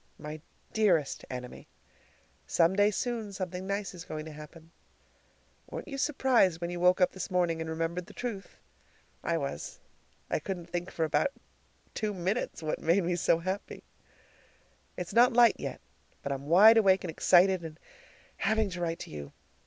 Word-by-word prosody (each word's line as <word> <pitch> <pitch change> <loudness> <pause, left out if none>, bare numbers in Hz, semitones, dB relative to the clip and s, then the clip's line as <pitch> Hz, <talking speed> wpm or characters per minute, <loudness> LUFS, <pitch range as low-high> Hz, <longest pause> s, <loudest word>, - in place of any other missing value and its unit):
My 150 0 -8 0.3
dearest 180 -10 +1
Enemy: 125 -1 -7 0.8
"Some 170 +2 +3
day 205 +1 +4
soon 225 -1 -3
something 185 -1 -5
nice 200 0 -2
is 175 -2 -8
going 155 0 -6
to 160 - -8
happen." 155 +2 -12 1.0
Weren't - - -7
you 275 -3 -5
surprised 250 - +3
when 170 0 -3
you 175 - -4
woke 180 +1 +4
up 180 - +4
this 190 - -6
morning 175 -3 +1
and 160 - -4
remembered 165 +2 -3
the - - -14
truth? 225 -6 -6 0.7
I 170 - 0
was! 140 -3 -5 0.5
I - - 0
couldn't 175 +1 -6
think 175 +1 -3
for 165 - -1
about 155 - +2 0.7
two 210 -2 -2
minutes 185 0 -2
what 155 - -2
made 170 +4 +3
me 175 +1 0
so 170 -1 +3
happy. 185 +4 -5 1.1
It's 180 -1 -5
not 245 +2 +6
light 240 0 +6
yet, - - -5 0.4
but 140 - -3
I'm 140 +1 -4
wide 210 +8 +8
awake 195 -3 +4
and 175 - -3
excited 185 +3 +4
and 160 -1 -9 0.6
having 220 -2 +1
to 180 -1 -5
write 165 -1 -1
to - - -8
you. 75 -2 -8
180 Hz, 170 wpm, -30 LUFS, 165-200 Hz, 1.1 s, wide